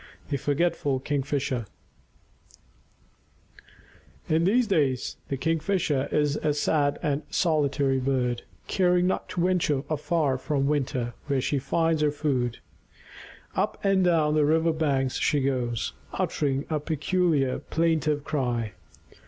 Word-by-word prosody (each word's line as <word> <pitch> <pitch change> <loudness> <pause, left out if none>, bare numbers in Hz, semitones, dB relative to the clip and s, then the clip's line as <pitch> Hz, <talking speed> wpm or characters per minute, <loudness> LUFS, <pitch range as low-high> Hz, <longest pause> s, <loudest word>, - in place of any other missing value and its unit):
THE 140 - 0
FORGETFUL 145 -1 0
KINGFISHER 135 -4 -1 2.6
In 160 +2 +2
these 235 +6 +3
days 145 - 0
the 135 - -2
Kingfisher 160 -2 0
is 150 -1 +1
a 150 -1 0
sad 145 -1 +1
and 145 -2 0
solitary 140 -5 +1
bird, 125 -2 0 0.2
caring 180 -1 +2
not 185 - -1
to 175 - -1
venture 165 -7 +1
far 150 -2 0
from 140 0 0
the 145 - +2
water 130 -4 -1
where 140 -2 +1
she 140 +2 0
finds 165 +3 +1
her 150 - +3
food. 135 -5 -1 1.0
Up - - -1
and 195 -1 +3
down 160 -4 +3
the 155 -1 +3
river 160 +2 +3
banks 140 -5 0
she 150 - +2
goes, 125 -4 -1 0.2
uttering 140 -1 -1
a 155 - +1
peculiar 155 -2 +1
plaintive 155 -3 0
cry. 120 -7 -1
145 Hz, 125 wpm, -26 LUFS, 135-160 Hz, 2.6 s, these